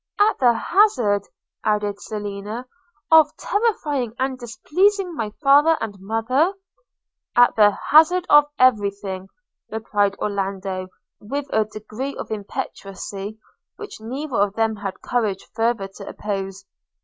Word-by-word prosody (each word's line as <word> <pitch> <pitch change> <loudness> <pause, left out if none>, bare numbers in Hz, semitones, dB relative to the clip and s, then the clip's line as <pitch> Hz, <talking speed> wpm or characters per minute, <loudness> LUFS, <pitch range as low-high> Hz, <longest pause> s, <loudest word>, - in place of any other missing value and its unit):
– - - -27
'At 420 +2 +3
the 245 -2 +5
hazard,' 235 - +2 0.4
added 210 -1 0
Selina, 210 +3 -5 0.5
'of 315 -2 +6
terrifying 295 - -1
and 265 0 -1
displeasing 350 - 0
my 225 -8 -3
father 290 +4 +6
and 215 -3 -4
mother?' 235 - +1 0.4
– - - -58
'At 245 0 +5
the 210 -2 +7 0.2
hazard 330 +4 +6
of 295 0 +7
every 225 -6 +4
thing!' 195 -1 -7 0.4
replied 205 -2 0
Orlando, 195 -2 -3 0.3
with 275 +7 -4
a 220 -1 +3
degree 215 +6 -6
of - - -7
impetuosity 200 0 -6 0.4
which 420 - -9
neither 260 +4 -4
of 200 0 +1
them 225 -1 0
had 200 -2 -6
courage 215 -6 -1
farther 225 -3 0
to 195 +1 -12
oppose. 195 -2 -5
220 Hz, 130 wpm, -22 LUFS, 200-280 Hz, 0.5 s, the